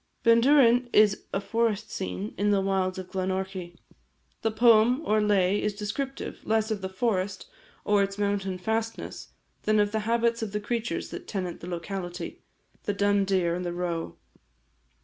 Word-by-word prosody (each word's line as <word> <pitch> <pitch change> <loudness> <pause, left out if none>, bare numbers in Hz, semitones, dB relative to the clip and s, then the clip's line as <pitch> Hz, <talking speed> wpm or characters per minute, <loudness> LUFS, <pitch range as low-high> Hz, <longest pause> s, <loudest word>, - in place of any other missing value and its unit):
Bendourain 240 +1 +5
is 210 -2 +4
a - - 0
forest 215 0 -1
scene 95 +3 -4
in 205 +3 +1
the 200 -1 +3
wilds 190 -1 0
of 185 -1 -7
Glenorchy. 190 -1 -3 0.7
The 225 - +1
poem, 235 +4 +4
or 215 0 +3
lay, 205 -1 +2
is 210 -1 -1
descriptive, 260 +7 -4
less 220 0 +1
of 210 -2 -2
the 190 - -3
forest, 190 -1 -1 0.4
or 205 -1 +3
its 195 0 -1
mountain 200 -2 -1
fastnesses, 220 +4 -3 0.3
than 215 0 +2
of 205 0 +2
the 220 - 0
habits 235 0 +2
of 215 -2 -4
the 210 - 0
creatures 235 +2 -3
that - - -7
tenant 185 -4 -4
the 175 - -8
locality 175 +1 -5 0.4
the 205 - -1
dun 205 0 +2
deer, 185 -3 +1
and 180 +1 -3
the 175 -1 -3
roe. 175 -2 -3
205 Hz, 165 wpm, -27 LUFS, 185-220 Hz, 0.7 s, Bendourain